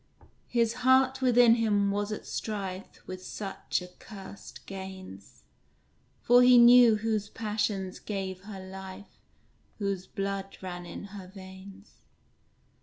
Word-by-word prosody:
His 235 -2 +1
heart 260 +1 +4
within 245 -2 +6
him 205 -3 +2
was 205 +1 -2
at 215 - -5
strife 195 -3 -5
With 185 0 -8
such 195 -2 -4
accursed 195 +2 -12
gains; 190 - -10 0.8
For 245 +1 +6
he 250 0 +7
knew 240 -1 +8
whose 215 -1 -1
passions 210 -4 -2
gave 190 -2 -5
her 205 -2 -8
life, 190 +1 -10 0.6
Whose 195 -3 -3
blood 195 -1 -4
ran 175 -2 -7
in - - -8
her 195 -3 -8
veins. 190 +1 -13
200 Hz, 115 wpm, -29 LUFS, 190-225 Hz, 0.8 s, knew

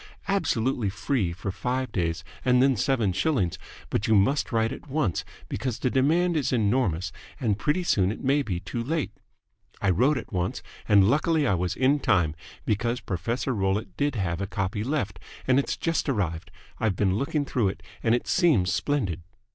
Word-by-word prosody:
absolutely 130 - +1
free 105 -2 -1
for 90 +3 -4
five 125 +6 -2
days 85 -4 -1 0.2
and 125 -1 +4
then 135 0 +4
seven 115 -4 +1
shillings, 105 - 0 0.3
but 105 - 0
you 110 - +4
must 135 +9 +2
write 115 -1 +1
at - - -8
once 135 - 0 0.2
because 125 -4 -3
the 125 - 0
demand 165 +6 +2
is 150 -4 0
enormous 105 -6 +1 0.3
and 110 -7 0
pretty 155 +5 +1
soon 95 - +2
it - - -7
may 140 +2 +3
be 95 -10 -2
too 100 +5 -4
late. 155 +4 -1 0.7
I 95 - +2
wrote 130 - +3
at 115 - -7
once, 90 -1 -2 0.3
and 100 -2 +6
luckily 155 +4 +2
I 110 - +2
was 90 -1 -1
in 135 +3 +3
time, 90 - +2 0.3
because 115 +3 0
Professor 115 +9 -2
Rollitt 95 -2 -1
did 145 +2 0
have 90 -4 -1
a 100 - -2
copy 100 +1 -2
left, 110 - -2 0.3
and 130 +1 +5
it's 140 - -1
just 165 -2 0
arrived. 85 -9 -1 0.3
I've 110 -4 +1
been 95 0 +2
looking 140 +7 0
through 120 -6 +1
it, 95 - -4 0.2
and 115 0 +3
it 120 - -2
seems 125 - +3
splendid." 95 - -1
115 Hz, 180 wpm, -26 LUFS, 95-135 Hz, 0.7 s, and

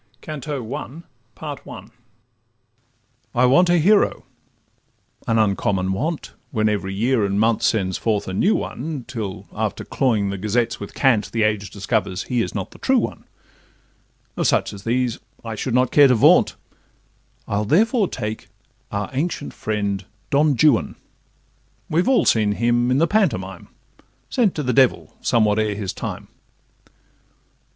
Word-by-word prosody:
CANTO 145 -5 -5
THE 140 +2 -6 0.4
FIRST - - -8 1.4
I 125 +1 +4
want 175 +8 +5
a 175 - +4
hero: 200 +6 +3 1.0
an 115 - +2
uncommon 95 -3 +1
want, 150 - -3 0.2
When 110 -4 0
every 100 -2 -1
year 115 +2 +1
and 100 0 0
month 110 0 +2
sends 95 -4 0
forth 105 -3 -1
a 95 - -4
new 195 - +2
one, 140 -1 -4
Till, 110 -6 -5
after - - -3
cloying 110 -7 0
the 100 - -5
gazettes 110 +4 0
with 100 - -8
cant, 120 -6 +2
The 115 -2 0
age 105 -2 0
discovers 100 -2 -2
he 125 -2 -1
is - - -4
not - - -4
the - - -15
true - - +2
one; - - -3 1.1
Of - - +1
such - - +1
as 100 0 -11
these 120 0 0 0.3
I 115 - -4
should 115 +3 -2
not 125 -1 +2
care 145 -1 +7
to 125 - +4
vaunt, 110 - +5 0.9
I'll 100 +1 0
therefore 215 - +3
take 110 -6 -5 0.4
our 100 -1 -2
ancient 145 +2 -3
friend 100 -2 -2 0.3
Don 145 0 +3
Juan— 145 -3 +3 1.0
We 160 +3 +3
all 255 +6 +3
have - - -2
seen 105 -2 +2
him, 120 +3 +1
in 130 - +2
the 160 - +4
pantomime, 115 - -1 0.6
Sent 230 -7 +2
to 150 - -2
the 125 -1 0
devil 130 0 +2
somewhat 110 -3 +2
ere 105 -1 0
his 100 -2 -4
time. - - -6
115 Hz, 150 wpm, -21 LUFS, 105-140 Hz, 1.4 s, care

